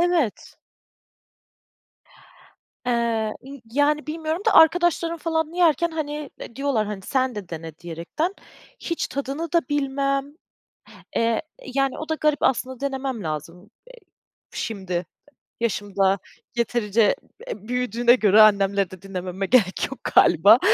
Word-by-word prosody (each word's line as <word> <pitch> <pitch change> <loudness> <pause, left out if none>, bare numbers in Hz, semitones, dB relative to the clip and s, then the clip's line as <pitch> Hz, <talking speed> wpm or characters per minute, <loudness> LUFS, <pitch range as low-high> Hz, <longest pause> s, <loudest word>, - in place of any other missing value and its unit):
Evet. 345 - 0 2.3
Eee, 230 -3 0
ımm, 280 0 -10
yani, 295 +3 +2
bilmiyorum 315 +3 -3
da - - +4
arkadaşlarım 335 +1 +4
falan 320 -1 -1
yerken 340 -1 +3
hani, 300 -2 -4
e, 235 - -10
diyorlar, 270 -7 0
hani, 205 -2 -5
sen 260 +2 0
de 200 -4 -7
dene 160 -1 -8
diyerekten, 175 - -3 0.4
hiç 335 - -3
tadını 280 +5 -4
da 340 - +5
bilmem, 275 0 -1 0.8
eee, 230 -1 +1 0.3
yani, 275 -1 +1
o 310 - -6
da 315 - +1
garip 305 -2 +1
aslında 260 -1 0
denemem 265 -4 -3
lazım, 170 +5 -6 0.2
e, - - -18 0.7
şimdi 190 -5 -3 0.5
yaşımda 200 -3 +1 0.4
yeterince, 230 -2 +2 0.3
e, 210 +1 -7
büyüdüğüne 245 -1 +3
göre 215 -3 +5
annemleri 200 -2 +4
de 185 0 -12
dinlememe 190 0 -4
gerek 210 -6 +2
yok 265 - -7 0.2
galiba. 200 +8 +7
245 Hz, 120 wpm, -23 LUFS, 200-295 Hz, 2.3 s, galiba